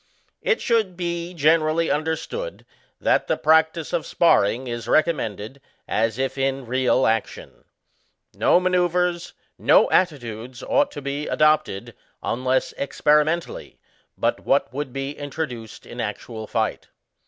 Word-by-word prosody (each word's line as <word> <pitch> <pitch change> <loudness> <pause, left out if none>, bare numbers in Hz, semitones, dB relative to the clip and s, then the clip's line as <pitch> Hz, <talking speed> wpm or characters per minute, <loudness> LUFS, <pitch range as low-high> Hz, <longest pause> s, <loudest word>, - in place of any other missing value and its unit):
It 470 - +1
should 220 -7 +1
be 170 -1 -3
generally 160 +1 +2
understood 160 - -3 0.3
that - - +2
the - - +1
practice 160 +1 +2
of - - -1
SPARRING 125 -6 +3
is 120 -2 -5
recommended, 130 - 0 0.3
as 110 +1 0
if 135 0 -2
in 135 -1 -1
real 130 +2 +2
action. 110 -1 -2 0.7
No - - +4
manceuvres, 180 -1 0 0.3
no - - +4
attitudes 125 -8 -1
ought 285 0 +2
to 145 - -7
be 140 +2 -3
adopted, 155 -10 +1 0.3
unless 130 +2 0
experimentally, 150 +4 0 0.4
but - - 0
what - - +1
would 140 -1 -4
be 135 +2 -4
introduced 140 -6 -6
in - - -6
actual 110 -2 -5
fight. 110 -1 -2
145 Hz, 120 wpm, -23 LUFS, 125-170 Hz, 0.7 s, No